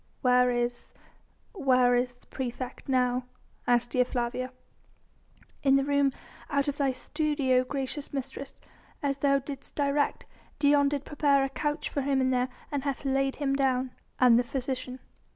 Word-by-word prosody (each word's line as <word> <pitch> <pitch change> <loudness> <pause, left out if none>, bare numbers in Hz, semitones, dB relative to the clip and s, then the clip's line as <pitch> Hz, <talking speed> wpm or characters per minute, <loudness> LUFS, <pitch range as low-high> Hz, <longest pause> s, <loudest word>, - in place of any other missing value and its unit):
"Where 250 0 +5
is... 240 0 -2 0.6
where 255 - +3
is 245 0 0
the 245 - -27
praefect 255 +1 -6
now?" 250 -1 +2 0.4
asked 240 0 +2
Dea 250 - +4
Flavia. 250 +1 -2 1.1
"In 270 -1 +4
the 275 - +3
room 280 -1 +2 0.4
out 280 -2 +1
of 285 0 -1
thy 275 -2 +2
studio, 265 -1 +1
gracious 275 +2 -4
mistress, 275 0 -6 0.4
as 280 -1 0
thou 275 0 +4
didst 275 0 -8
direct. 285 0 0 0.3
Dion 285 -1 +4
did 285 -1 -3
prepare 285 -2 +2
a 270 - -1
couch 295 +3 -2
for 285 - -2
him 265 -1 +1
there, 250 0 +1 0.2
and 285 -2 -1
hath 280 -1 -3
laid 270 0 +1
him 275 -2 0
down." 260 -2 +1 0.3
"And 245 -2 +6
the - - +2
physician?" 255 0 -4
270 Hz, 150 wpm, -28 LUFS, 250-280 Hz, 1.1 s, And